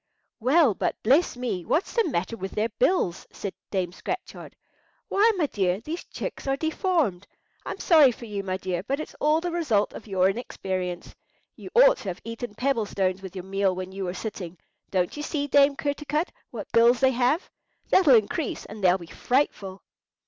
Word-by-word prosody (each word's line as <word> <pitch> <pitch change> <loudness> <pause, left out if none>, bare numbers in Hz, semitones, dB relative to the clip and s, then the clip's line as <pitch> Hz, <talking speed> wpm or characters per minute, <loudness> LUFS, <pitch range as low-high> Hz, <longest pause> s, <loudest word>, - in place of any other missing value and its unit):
"Well, 265 +1 +4
but - - -1
bless 270 +4 +3
me, 220 -8 -3
what's 320 - 0
the 460 -5 +2
matter 185 -1 -2
with 190 -3 -6
their 215 +2 0
bills?" 215 - 0
said 200 - -5 0.2
Dame 185 -3 -1
Scratchard. 370 - -6 0.5
"Why, 435 +3 +4
my 335 - +2
dear, 190 -7 0
these 310 +10 -6
chicks - - -6
are 270 0 +1
deformed! 315 - 0 0.4
I'm - - -4
sorry 305 -7 +6
for 235 - -10
you, 205 -3 -4
my 185 -1 -3
dear; 185 -2 -3
but 270 +9 -2
it's 310 - -6
all 305 +2 +3
the 350 0 -2
result 260 -12 +1
of - - -10
your 190 -2 +3
inexperience. 185 -4 -4 0.4
You - - -10
ought - - +7
to - - -11
have 180 -1 -4
eaten 230 -1 -6
pebble 250 -3 0
stones 190 -1 -1
with 190 -1 -9
your 185 -1 -6
meal 195 -1 0
when 185 0 -5
you 190 0 -4
were 180 +1 -4
sitting. 185 -6 -6 0.3
Don't 180 -2 0
you 295 - -5
see, 295 -1 -2
Dame 280 0 +4
Kertarkut, 295 +3 -2 0.2
what - - -8
bills 235 +1 +5
they 265 0 +4
have? 255 +7 +1 0.4
That'll 310 -9 +6
increase, 230 - 0
and 210 -1 -10
they'll 180 0 +5
be 175 - -10
frightful!" 200 - -1
230 Hz, 185 wpm, -26 LUFS, 190-290 Hz, 0.5 s, ought